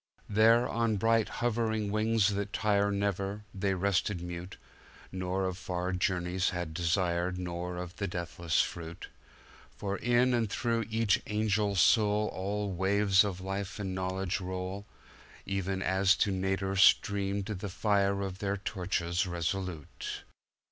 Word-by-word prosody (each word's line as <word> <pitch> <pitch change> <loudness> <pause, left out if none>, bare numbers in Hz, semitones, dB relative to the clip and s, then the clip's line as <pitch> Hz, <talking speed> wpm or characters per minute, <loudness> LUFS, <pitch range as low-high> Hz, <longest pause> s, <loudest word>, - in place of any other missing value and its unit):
There, 115 +3 +5
on 115 -2 0
bright 115 +2 +2
hovering 110 -3 -1
wings 110 -1 +2
that 100 0 -3
tire 100 -1 +2
Never, 100 0 -2
they 95 0 0
rested 100 0 0
mute, 90 +1 -7 0.5
Nor 95 0 -2
of 95 0 -3
far 90 0 -2
journeys 90 0 0
had 90 -3 -4
desire, 85 +1 +1
Nor 90 -1 -4
of 90 +1 -7
the 100 - -2
deathless 85 -2 0
fruit; 85 +1 -7 0.7
For 100 0 -2
in 120 +2 +3
and 115 -3 +1
through 115 +1 -1
each 110 -2 +2
angel 105 -1 +1
soulAll 105 0 +2
waves 95 +1 +4
of 95 -3 -3
life 95 +1 -4
and 95 -2 -3
knowledge 95 0 -2
roll, 95 +2 -5 0.6
Even 95 -1 -2
as 95 +1 +3
to 100 - +1
nadir 95 0 -1
streamed 100 0 +3
the 100 -1 -4
fire 100 0 +1
Of 95 -1 -5
their 100 0 -1
torches 90 -2 -1
resolute. 85 -2 -4
95 Hz, 135 wpm, -30 LUFS, 90-105 Hz, 0.7 s, There